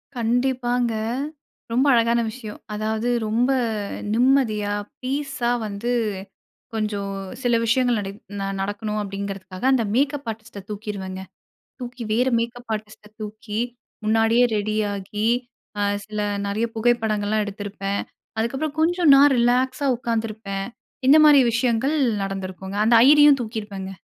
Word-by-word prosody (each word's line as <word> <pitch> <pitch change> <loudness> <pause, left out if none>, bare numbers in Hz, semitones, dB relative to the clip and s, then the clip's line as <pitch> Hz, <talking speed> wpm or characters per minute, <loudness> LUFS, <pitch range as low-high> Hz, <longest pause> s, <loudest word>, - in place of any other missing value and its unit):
கண்டிப்பாங்க, 245 0 +1 0.8
ரொம்ப 255 +4 +2
அழகான 235 0 +3
விஷயம். 215 -3 -9
அதாவது 220 +2 -1 0.2
ரொம்ப 240 +5 +2 0.6
நிம்மதியா 225 -4 +2 0.3
பீஸா 270 -2 -2 0.2
வந்து 210 +4 -3 0.8
கொஞ்சம் 210 -2 -2 0.3
சில 245 -2 +2
விஷயங்கள் 245 0 +2
நடை 195 -1 -4 0.5
நடக்கணும் 210 +2 -3
அப்டிங்கிறதுக்காக 195 -1 -6
அந்த 255 -3 +3
மேக்கப் 280 0 0
ஆர்டிஸ்ட்ட 220 -1 -10
தூக்கிருவேங்க. 200 -3 -5 0.6
தூக்கி 245 0 -7
வேற 250 +4 +2
மேக்கப் 235 0 -4
ஆர்டிஸ்ட்ட 215 0 -8
தூக்கி 215 0 -5 0.5
முன்னாடியே 225 +2 +4
ரெடியாகி 210 0 -1 0.5
அ - - +2 0.2
சில 210 0 -5 0.3
நறைய 215 +3 0
புகைப்படங்கள்லாம் 220 -2 +1
எடுத்திருப்பேன். 200 -1 -4 0.4
அதுக்கப்புறம் 270 +7 -2
கொஞ்சம் 340 -1 +3
நான் 280 +1 +7
ரிலாக்ஸா 255 +3 +2
உட்காந்துருப்பேன். 220 -4 -3 0.4
இந்த 280 - +8
மாரி 290 -2 +8
விஷயங்கள் 245 +5 +1 0.3
நடந்திருக்குங்க 190 0 -5
அந்த 230 0 +6
ஐயரியும் 290 +1 +7
தூக்கிருப்பேங்க. 205 -4 -6
225 Hz, 105 wpm, -23 LUFS, 205-245 Hz, 0.8 s, இந்த